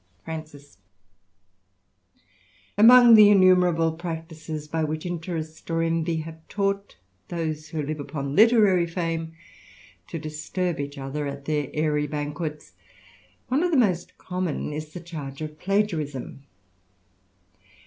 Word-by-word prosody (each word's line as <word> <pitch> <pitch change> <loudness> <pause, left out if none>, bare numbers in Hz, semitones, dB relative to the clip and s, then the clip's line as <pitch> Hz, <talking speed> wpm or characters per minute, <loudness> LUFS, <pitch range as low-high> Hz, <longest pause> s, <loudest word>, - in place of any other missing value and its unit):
Franci& 155 -2 -7 2.2
A 205 - 0
MONG 240 +1 +9
the 210 -2 +9
innumerable 180 -4 +4
practices 160 -2 -6
by 160 +1 -1
which 155 +1 -3
interest 165 -2 -5
or 165 0 0
"^^ - - +1
envy 165 0 0
have 160 0 -9
taught 200 0 -2 0.3
those 155 -2 -4
who 155 -1 -3
live 150 +1 -4
upon 140 -1 -4
literary 210 -5 +5
fem^ 165 -1 -3 0.7
to - - -5
disturb 155 +3 -3
each 140 0 -5
other 140 +2 -4
at 140 0 -7
their 150 -2 -1
airy 150 -1 +1
banquets, 150 +1 -5 0.7
one 265 +4 +1
of 355 - +2
the 320 - +2
most 185 -8 +1
common 180 -5 -3
is 155 0 -6
the 175 - -7
charge 150 -5 -8
of 155 -1 -7
plagiarism. 160 -9 -2
160 Hz, 130 wpm, -25 LUFS, 150-180 Hz, 2.2 s, MONG